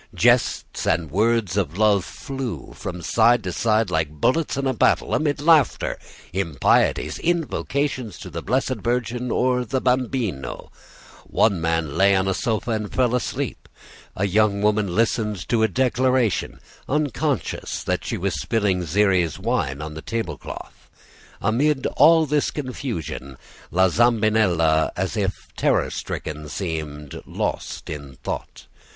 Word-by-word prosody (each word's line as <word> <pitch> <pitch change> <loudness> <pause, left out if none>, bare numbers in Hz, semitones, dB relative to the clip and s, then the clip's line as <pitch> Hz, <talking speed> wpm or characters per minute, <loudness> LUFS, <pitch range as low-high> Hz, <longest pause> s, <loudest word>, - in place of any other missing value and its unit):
Jests - - +2
and 80 -3 +1
words 110 -1 +1
of 90 -4 -1
love 105 -3 +4
flew 130 - -6
from 90 -2 -6
side 115 +5 +4
to 95 - -3
side 110 -2 +1
like 80 -2 +1
bullets 130 - 0
in 140 - -1
a 130 - +1
battle, - - +2
amid 145 -3 +1
laughter, 150 -4 +3 0.3
impieties, 85 -7 +1
invocations 145 - -1
to - - -9
the - - -4
Blessed 130 0 0
Virgin 120 +1 -1
or 125 0 +1
the 130 +2 -1
Bambino. 125 - -1 0.6
One 100 -6 +2
man 80 -3 -1
lay 100 0 +5
on 95 0 +1
a 95 - +2
sofa 110 +4 -1
and 105 -2 -2
fell 125 -2 +1
asleep. 125 - -3 0.5
A 100 - 0
young 100 +1 +2
woman 105 -4 +1
listened 105 -4 0
to 115 -2 +2
a 110 - +5
declaration, 130 -3 +1 0.3
unconscious 145 - -1
that - - -1
she - - -3
was - - -2
spilling 100 -5 +1
Xeres 90 -1 +2
wine 70 +3 -1
on 75 0 -6
the 80 - -7
tablecloth. 110 - -6 0.5
Amid 135 +7 +1
all 160 +3 +6
this 150 0 +1
confusion 120 - -5 0.3
La 95 +3 +4
Zambinella, 105 -8 +3
as - - -1
if - - -2
terror - - +1
stricken, 75 -1 -5
seemed 75 -4 -5
lost - - -3
in 70 -3 -7
thought. - - -5
110 Hz, 135 wpm, -23 LUFS, 85-125 Hz, 0.6 s, all